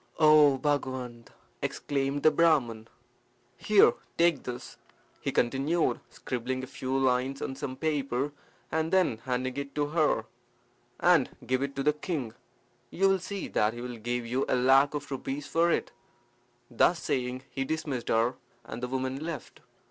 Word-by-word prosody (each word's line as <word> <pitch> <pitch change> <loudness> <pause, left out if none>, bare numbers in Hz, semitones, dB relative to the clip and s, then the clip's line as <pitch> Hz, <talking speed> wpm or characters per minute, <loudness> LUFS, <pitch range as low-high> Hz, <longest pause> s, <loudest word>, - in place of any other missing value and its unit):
"O 150 -3 +6
Bhagawant!" 130 -4 -2 0.3
exclaimed 140 0 -2
the 155 - +7
Brahman. 140 -9 +2 0.7
"Here, 210 -2 +5 0.2
take 170 -3 +3
this," 125 0 -7 0.4
he - - -2
continued, 140 +7 +1
scribbling 130 +1 -4
a - - -3
few 130 +1 -3
lines 130 +1 +1
on 135 - -4
some 130 -1 -5
paper, 140 -3 -1 0.4
and 160 +1 0
then 185 -12 +2
handing 130 0 -2
it 140 0 -5
to 145 0 0
her, 150 -8 +1 0.7
"and 175 -7 +4 0.2
give 130 +2 0
it 140 0 -3
to 135 - -2
the 150 - +3
king. 150 -7 -4 0.6
You 195 +7 +2
will 195 0 +2
see 195 +2 -5
that 105 +2 +1
he 120 - -7
will 125 -1 -6
give 120 +2 -3
you 125 +3 0
a - - +3
lac 135 +3 +4
of 145 -1 -5
rupees 135 +2 -4
for 165 +3 +2
it." - - 0 0.8
Thus 170 +8 +3
saying 125 0 -2
he 135 - -2
dismissed 145 -4 -3
her, 115 +2 +2 0.3
and 120 - -7
the 125 - -2
woman 130 +2 -3
left. 160 -7 -6
135 Hz, 155 wpm, -29 LUFS, 125-155 Hz, 0.8 s, the